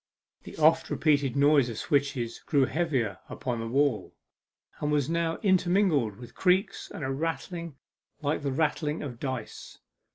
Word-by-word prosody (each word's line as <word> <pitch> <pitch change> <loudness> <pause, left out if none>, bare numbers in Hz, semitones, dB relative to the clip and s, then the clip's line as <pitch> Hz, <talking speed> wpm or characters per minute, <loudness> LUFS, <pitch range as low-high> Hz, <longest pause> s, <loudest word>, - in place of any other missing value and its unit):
The - - -10
oft 160 +1 +4
repeated 145 -5 +1
noise 140 -2 +4
of 115 - -6
switches 135 -5 -1
grew 140 -3 +2
heavier 130 - -1
upon 120 -3 -3
the 115 - -4
wall, 135 -1 0 0.6
and 150 - -1
was 150 0 +1
now 165 -1 0
intermingled 180 - +2
with 120 +3 -12
creaks, 190 +2 +1
and 150 - -7
a 135 - -1
rattling 165 +2 -4 0.4
like 150 +1 -1
the 140 -1 -1
rattling 150 +2 -1
of 125 -5 -7
dice. 130 -5 -6
145 Hz, 150 wpm, -28 LUFS, 130-165 Hz, 0.6 s, oft